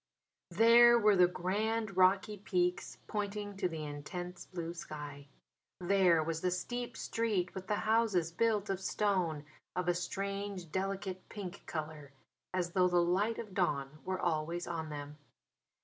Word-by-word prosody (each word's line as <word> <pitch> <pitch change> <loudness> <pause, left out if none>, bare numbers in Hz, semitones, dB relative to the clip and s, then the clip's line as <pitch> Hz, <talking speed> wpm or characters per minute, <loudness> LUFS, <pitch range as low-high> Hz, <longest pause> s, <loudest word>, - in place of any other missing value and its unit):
There 235 +1 +7
were 210 -2 +5
the 180 -1 +6
grand 205 +4 -1
rocky 190 +3 +4
peaks 180 -2 -1
pointing 205 -1 -3
to 185 -2 0
the 160 -2 -5
intense 175 +5 -6
blue 170 -2 -5
sky. 145 -4 -8 0.5
There 180 -3 +4
was 165 0 -3
the 180 - +2
steep 240 +6 -3
street 210 -6 -1
with 190 0 -7
the 210 - +1
houses 215 -7 +2
built 215 +1 +1
of 195 -1 -3
stone 185 -7 0 0.3
of 180 -1 -1
a 175 - +4
strange, 195 0 -4
delicate 190 0 -3
pink 200 -2 -7
colour, 150 -3 -5 0.4
as 180 -2 -1
though 180 0 +4
the 175 -1 +2
light 190 +6 +2
of 210 -4 -7
dawn 150 -6 -1
were 185 0 -2
always 170 +1 -1
on 160 -2 -4
them. 145 0 -7
185 Hz, 150 wpm, -33 LUFS, 170-205 Hz, 0.5 s, There